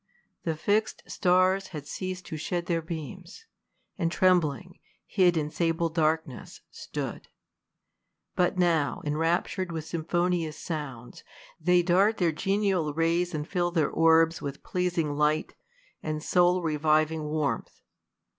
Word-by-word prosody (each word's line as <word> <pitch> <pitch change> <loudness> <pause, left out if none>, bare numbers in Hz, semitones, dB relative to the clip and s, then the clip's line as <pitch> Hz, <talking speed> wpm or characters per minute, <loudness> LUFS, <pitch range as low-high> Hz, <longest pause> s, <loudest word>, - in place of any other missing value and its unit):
The 165 -2 0
iixed 205 +7 0
stars 185 +2 +2
had 150 -4 -8
ceas'd 185 +3 -5
to - - -6
shed 170 +3 -3
their 170 -1 0
beams, 170 - -8 0.5
And 165 0 0
trembling, 180 -1 +1 0.3
hid 180 -4 +3
in 150 -1 -1
sable 165 0 0
darkness, 160 -4 -1
stood; - - -6 1.1
But 180 +1 +1
now, 165 -5 +1
enraptur'd 170 +4 0
with 160 -2 -4
symphonious 170 -1 -1
sounds, 140 -7 -6 0.4
They 175 +2 +3
dart 195 +5 +3
their 175 -3 +2
genial 190 -3 0
rays, 170 +1 +1
and 150 0 -4
fill 175 -2 0
their 170 -3 +1
orbs 165 0 +4
lYith 140 -1 -6
pleasing 175 -4 -1
light, 150 +1 +1 0.5
and 155 -1 -4
soul 180 0 +3
reviving 155 0 +1
warmth. 150 -5 -2
165 Hz, 125 wpm, -27 LUFS, 155-180 Hz, 1.1 s, orbs